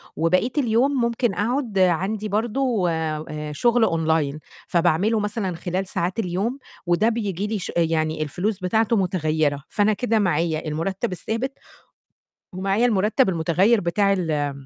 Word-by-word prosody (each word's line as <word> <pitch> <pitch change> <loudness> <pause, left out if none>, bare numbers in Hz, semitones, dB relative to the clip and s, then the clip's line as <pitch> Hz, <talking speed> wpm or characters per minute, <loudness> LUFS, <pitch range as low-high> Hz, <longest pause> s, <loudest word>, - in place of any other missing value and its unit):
وبقيت 185 - +1
اليوم 250 +1 +2
ممكن 235 -2 0
أقعُد 230 -1 -1
عندي 190 +4 +1
برضه 225 -2 0
آآ 155 -1 -3
شُغل 235 +9 +2
أونلاين، 160 -4 +1 0.3
فباعمله 180 +6 +2
مثلًا 205 -4 -2
خلال 185 +2 -3
ساعات 180 +5 -2
اليوم، 205 +7 -1 0.3
وده 175 +6 +3
بييجي 205 -4 -2
لي 215 -1 -2
ش - - -5
يعني 160 -2 +1
الفلوس 185 +7 -2
بتاعته 220 +5 +1
متغيّرة. 155 -7 0
فأنا 210 +1 +2
كده 225 0 0
معايا 165 -4 0
المُرتَّب 170 +6 -2
الثابت 225 +8 -3 1.0
ومعايا 195 +5 +1
المُرتَّب 210 -3 +2
المُتغيّر 185 +6 +2
بتاع 195 +3 +1
ال 155 -6 -1
190 Hz, 130 wpm, -23 LUFS, 165-220 Hz, 1.0 s, وده